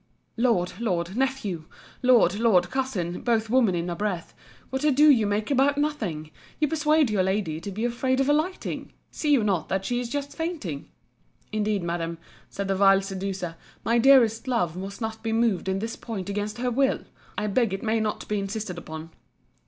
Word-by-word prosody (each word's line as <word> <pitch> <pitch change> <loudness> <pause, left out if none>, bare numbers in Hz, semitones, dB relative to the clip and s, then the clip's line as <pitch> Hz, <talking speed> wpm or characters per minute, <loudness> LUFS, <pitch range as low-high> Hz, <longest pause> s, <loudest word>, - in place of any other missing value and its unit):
Lord, 230 -8 +1
Lord, 180 -5 -1
Nephew, 235 -11 -1 0.4
Lord, 235 -6 +4
Lord, 185 -7 +3
Cousin, 210 -11 -2
both 225 -2 0
women 235 -8 +4
in 170 0 -2
a 175 - -2
breath, 185 -3 -3 0.4
what 265 +2 -2
ado 300 0 +5
you 225 -6 +3
make 210 +4 -1
about 280 +1 +3
nothing! 210 - -2 0.3
You 300 - +3
persuade 305 -4 +3
your 205 -3 +2
lady 190 -4 -1
to 200 - -5
be 215 +4 -3
afraid 260 +2 0
of 270 - +2
alighting.—See 305 -1 -2
you 270 -6 +4
not 190 -6 0
that 190 0 -1
she 245 +2 0
is 245 -1 -4
just 285 +1 -4
fainting? 310 - -4 0.6
Indeed, 210 -3 0
Madam, 170 -1 -3 0.3
said 200 0 -4
the 195 - +1
vile 195 0 +5
seducer, 190 -3 -4 0.3
my 235 +1 +3
dearest 240 -2 +5
love 200 -10 0
must 195 +4 -7
not 220 0 -4
be 225 0 -2
moved 225 -5 +1
in 190 - 0
this 225 +3 -4
point 200 -5 -6
against 210 +2 -3
her 250 +1 -1
will. 265 +2 +2 0.4
I 210 - -1
beg 220 +1 +1
it 195 - -4
may 225 0 +1
not 215 -1 -2
be 210 -1 0
insisted 195 -2 -4
upon. 160 0 -8
215 Hz, 185 wpm, -26 LUFS, 190-255 Hz, 0.6 s, ado